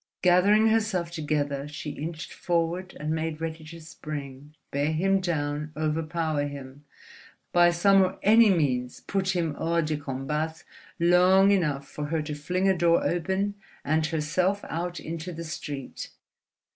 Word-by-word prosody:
Gathering 200 +5 +5
herself 210 -6 0
together, 145 -3 -2
she 150 0 -6
inched 160 +2 -6
forward 175 +1 -2
and 150 +1 -2
made 160 -1 -2
ready 160 0 -5
to 165 +2 -10
spring, 150 -2 -8 0.2
bear 145 +2 0
him 195 +5 +2
down, 150 -4 -2
overpower 155 -1 -1
him—by 145 +5 -2
some 195 +3 +4
or 185 -1 0
any 225 +2 +6
means 130 -9 0
put 190 -1 -1
him 165 -4 0
hors 170 0 +1
de 155 -1 -1
combat 150 +3 -3 0.4
long 180 +3 +5
enough 150 -8 0
for 150 - -5
her 155 +1 -1
to 150 0 -5
fling 180 +6 -1
a 190 - +4
door 170 -1 +3
open 190 +4 -1 0.3
and 155 +1 +1
herself 175 +5 0
out 175 +1 -3
into 165 +2 -6
the 165 0 -6
street.... 145 -3 -6
165 Hz, 145 wpm, -27 LUFS, 150-180 Hz, 0.4 s, any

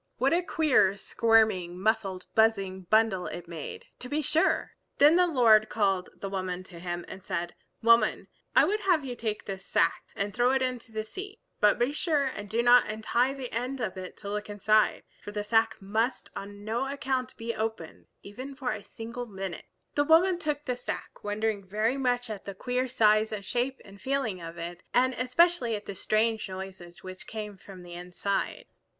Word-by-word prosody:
What 270 +4 +2
a 345 - +3
queer, 295 - +3
squirming, 205 -5 +2
muffled 195 -3 0
buzzing 195 -5 +2
bundle 215 -4 +3
it 175 -1 -7
made, 165 -3 -7
to 250 - -7
be 300 +2 0
sure! 310 +4 +2 0.3
Then 295 +3 +7
the 360 0 +5
Lord 225 -8 +5
called 195 -4 +1
the 195 - -6
woman 185 -2 -3
to 180 -2 -12
him 175 0 -4
and 190 - -9
said, 170 -1 -3 0.3
"Woman, 230 +1 +4 0.3
I - - +7
would 425 +2 0
have 355 -8 +2
you 250 -2 -4
take 220 -3 -3
this 195 -1 -6
sack - - +1
and 200 0 -2
throw 245 +1 +3
it 265 -1 +2
into 250 -2 -3
the 220 0 -3
sea. 390 - -8 0.2
But 210 -1 +5
be 240 +3 +1
sure 300 -1 +1
and 205 -6 -4
do 230 +3 +1
not 245 +1 +6
untie 235 +5 0
the 260 -3 -6
end 250 +4 -2
of 215 -6 -2
it 185 -1 -8
to 200 - -7
look 210 0 -3
inside; 215 +1 +2 0.2
for 205 - -8
the 210 0 -3
sack 225 +1 +2
must 220 +6 -1
on 205 +1 -8
no 240 +5 -1
account 260 -1 -2
be 230 0 -3
opened, 220 -7 -4 0.2
even 255 +7 -8
for 260 -2 -2
a 215 -2 -5
single 235 +3 -7
minute." 195 -4 -6 0.3
The 290 - +3
woman 340 +4 +5
took 300 -2 -2
the 250 - -1
sack, 245 - -6
wondering 210 0 -1
very 215 +7 0
much 245 -1 +1
at 205 -2 -7
the 200 - -6
queer 250 +5 -1
size 215 -3 +3
and 205 -2 -5
shape 250 +5 -1
and 195 0 -14
feeling 260 -6 -1
of 165 0 -8
it, 170 +1 -6
and 255 +1 +4
especially 255 -1 +2
at 205 - -7
the - - -5
strange 215 +2 0
noises 190 -1 -8
which 185 0 -8
came 210 -2 -6
from 190 -1 -12
the 175 0 -10
inside. 180 +3 -3
220 Hz, 190 wpm, -28 LUFS, 195-255 Hz, 0.3 s, Then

